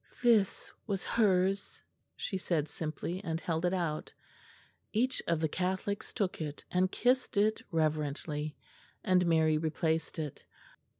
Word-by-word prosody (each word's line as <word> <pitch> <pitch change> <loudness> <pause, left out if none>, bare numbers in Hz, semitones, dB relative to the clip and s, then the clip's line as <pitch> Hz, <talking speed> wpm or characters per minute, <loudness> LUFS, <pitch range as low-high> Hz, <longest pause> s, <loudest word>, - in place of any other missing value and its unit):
"This 225 -5 +3 0.2
was 195 -3 -1
hers," 195 -3 +2 0.4
she - - -3
said 165 -5 0
simply, 165 +5 -4
and 165 -3 -2
held 165 0 -1
it 175 - +2
out. 165 -4 -2 0.8
Each 255 +4 +1
of 170 -2 +2
the 160 - +3
Catholics 185 +4 -2
took 190 -5 -1
it 150 -1 -4
and 185 +1 +2
kissed 250 -3 +1
it 215 +2 +3
reverently, 150 -2 -1 0.5
and 185 -1 +4
Mary 160 -2 +4
replaced 160 +1 -1
it. 150 -4 -4
175 Hz, 130 wpm, -32 LUFS, 155-195 Hz, 0.8 s, and